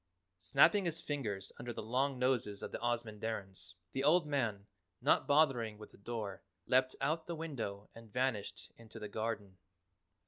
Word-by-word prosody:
Snapping 205 -3 +5
his 165 -1 0
fingers 110 -12 -3
under 120 - -4
the 110 - -5
long 130 +4 +1
noses 125 -5 +1
of - - -4
the - - -4
Ozamandarins, 110 -6 -3 0.2
the 135 - -1
old 160 +3 +5
man, 115 -9 0 0.3
not - - +3
bothering 135 -8 +3
with 105 - -11
the - - -17
door, 105 -2 -4 0.2
leapt 130 0 +3
out 155 +4 0
the 170 - -3
window 115 -11 -4
and 115 -2 -13
vanished 125 -4 -1
into 115 0 -11
the 105 -1 -5
garden. 105 -3 -3
115 Hz, 160 wpm, -35 LUFS, 105-135 Hz, 0.3 s, Snapping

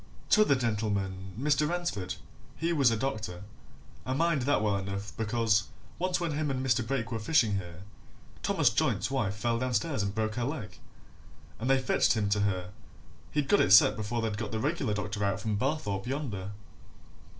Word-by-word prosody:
T'other 215 -10 +5
gentleman, 100 -5 -2
Mr. 150 +2 +2
Ransford, 135 - -2 0.4
he 165 +2 0
was 140 -6 +4
a 115 - 0
doctor 110 -7 -3 0.6
I 130 - -2
mind 160 0 +2
that 125 -4 +2
well 105 -2 +2
enough, 100 +1 -5
because 110 -2 +1 0.3
once 180 0 0
when 170 -2 -1
him 150 0 -1
and 130 -1 -2
Mr. 130 -1 +3
Brake 120 0 -2
were 115 - -2
fishing 110 -4 +2
here, 90 -1 -7 0.6
Thomas - - +2
Joynt's - - 0
wife 110 -8 0
fell 115 +2 0
downstairs 130 +1 0
and 100 0 -2
broke 110 0 -1
her 120 - 0
leg, 125 -5 -5 0.8
and 120 +4 -2
they 135 - +5
fetched 130 - +2
him 105 -3 0
to 105 0 +2
her 95 -2 -1 0.6
he'd 150 -2 0
got 205 - +4
it 95 - +4
set 100 - +8
before 110 +2 -2
they'd 110 -2 -2
got 110 -3 -4
the 110 - -2
reg'lar 135 -5 -1
doctor 105 0 -3
out 100 +1 0
from 110 0 -1
Barthorpe 110 -5 -2
yonder." 120 -9 -3
115 Hz, 180 wpm, -29 LUFS, 100-135 Hz, 0.8 s, set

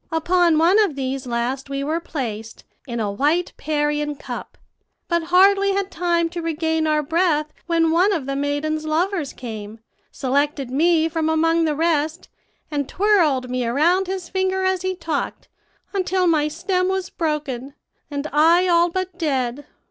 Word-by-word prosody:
Upon 340 0 +3
one 345 +6 +4
of 405 -9 +2
these 265 -1 -3
last 245 +3 -2
we 275 0 -3
were 315 +4 -1
placed, 225 -9 -6 0.2
in 235 -2 -4
a 210 -2 -1
white 300 - 0
Parian 295 -1 -1
cup, - - -8 0.5
but 340 -2 0
hardly 390 +3 +4
had 395 -1 -2
time 340 -1 +1
to 340 0 -5
regain 320 -1 -1
our 305 -1 +2
breath 305 -1 +1
when 330 -1 +2
one 360 +5 +3
of 325 -9 -1
the 275 0 -3
maiden's 290 +2 -1
lovers 330 -1 0
came, 220 -3 -8 0.3
selected 275 0 -1
me 320 +3 +3
from 320 -1 -1
among 330 +1 +2
the 305 -2 0
rest, 320 0 0 0.4
and 285 -2 -2
twirled 340 -11 +2
me 250 0 -2
around 330 +11 +2
his 375 -2 -4
finger 380 0 0
as 375 -1 +1
he 375 0 -2
talked, 325 -5 -4 0.4
until 370 -1 +1
my 310 -3 +3
stem 365 +4 -1
was 380 -1 -2
broken, 285 -5 -3 0.3
and 285 0 -4
I 335 +5 +5
all 345 0 +4
but 370 0 -4
dead. 270 -4 -1
320 Hz, 160 wpm, -21 LUFS, 285-355 Hz, 0.5 s, I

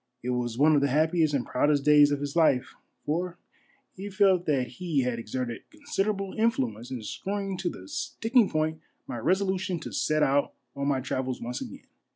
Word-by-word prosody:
It 125 - -1
was 120 -2 -2
one 155 +3 +5
of 145 - +4
the 140 - +3
happiest 155 +2 +2
and 125 - -1
proudest 145 +2 +1
days 150 -1 +7
of 145 -1 -1
his 145 +1 -4
life, 155 -7 +3 0.3
for 175 +3 -2 0.6
he 195 +2 -7
felt 190 -3 +3
that 135 -4 +2
he 150 +2 -2
had 125 -2 -1
exerted 120 +1 -5
considerable 210 -10 -2
influence 130 - 0
in 125 -4 -5
screwing 195 - -3
to 180 -1 -1
the 95 - -10
sticking 225 - +1
point 155 0 -1 0.3
my 120 - -5
resolution 185 - 0
to - - -7
set 155 0 +1
out 140 +1 +1 0.2
on 140 0 -2
my 135 -2 +1
travels 130 0 -3
once 120 +1 -5
again. - - -8
150 Hz, 185 wpm, -27 LUFS, 130-185 Hz, 0.6 s, days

